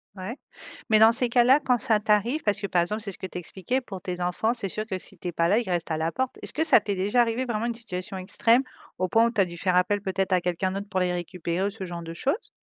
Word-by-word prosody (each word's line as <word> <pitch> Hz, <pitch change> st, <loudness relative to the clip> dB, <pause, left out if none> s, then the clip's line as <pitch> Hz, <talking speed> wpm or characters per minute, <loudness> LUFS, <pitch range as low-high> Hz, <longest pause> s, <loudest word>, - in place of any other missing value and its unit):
Ouais, 195 Hz, +8 st, -6 dB, 0.5 s
mais 215 Hz, -, +6 dB
dans 220 Hz, +1 st, +8 dB
ces 250 Hz, +1 st, +3 dB
cas-là, 245 Hz, +4 st, +5 dB
quand 250 Hz, -3 st, +2 dB
ça 220 Hz, -1 st, +2 dB
t'arrive 215 Hz, +8 st, +1 dB
parce 205 Hz, 0 st, 0 dB
que 200 Hz, -, -2 dB
par 180 Hz, -3 st, +2 dB
exemple, 210 Hz, +5 st, -2 dB
c'est 200 Hz, -2 st, -3 dB
ce -, -, -9 dB
que 190 Hz, -, -6 dB
tu 180 Hz, -, -8 dB
expliquais 190 Hz, +9 st, -3 dB
pour 195 Hz, -7 st, -8 dB
tes 180 Hz, -2 st, -5 dB
enfants, 180 Hz, +6 st, 0 dB
c'est 200 Hz, -5 st, -3 dB
sûr 215 Hz, +3 st, -4 dB
que 190 Hz, -4 st, -3 dB
si 195 Hz, -, -8 dB
tu 180 Hz, -, -7 dB
es -, -, -2 dB
pas 170 Hz, +1 st, +1 dB
là, 215 Hz, +4 st, +4 dB
ils 230 Hz, -, -4 dB
restent 175 Hz, -2 st, -1 dB
à 155 Hz, -, 0 dB
la 160 Hz, +1 st, -1 dB
porte. 260 Hz, -1 st, -2 dB
Est-ce -, -, -5 dB
que 315 Hz, -, +1 dB
ça 320 Hz, -, +6 dB
t'est 205 Hz, -1 st, -3 dB
déjà 200 Hz, +6 st, +1 dB
arrivé, 235 Hz, +1 st, +2 dB
vraiment 230 Hz, -3 st, -2 dB
une 235 Hz, -, -1 dB
situation 190 Hz, -5 st, -6 dB
extrême, 230 Hz, +6 st, +2 dB, 0.3 s
au 185 Hz, -1 st, -1 dB
point 225 Hz, +4 st, +4 dB
où 235 Hz, -, +1 dB
tu 220 Hz, -4 st, +2 dB
as -, -, +4 dB
dû 170 Hz, -1 st, -9 dB
faire 180 Hz, +1 st, 0 dB
appel 185 Hz, +3 st, +2 dB
peut-être 190 Hz, -1 st, -2 dB
à 185 Hz, -, +4 dB
quelqu'un 180 Hz, +1 st, -1 dB
d'autre 200 Hz, +1 st, -5 dB
pour 185 Hz, -1 st, -1 dB
les 180 Hz, -1 st, +1 dB
récupérer 175 Hz, +1 st, -2 dB
ou -, -, -1 dB
ce 200 Hz, -1 st, -8 dB
genre 175 Hz, -1 st, -6 dB
de 165 Hz, 0 st, -7 dB
choses? 280 Hz, -, -2 dB
200 Hz, 300 wpm, -26 LUFS, 180-230 Hz, 0.5 s, dans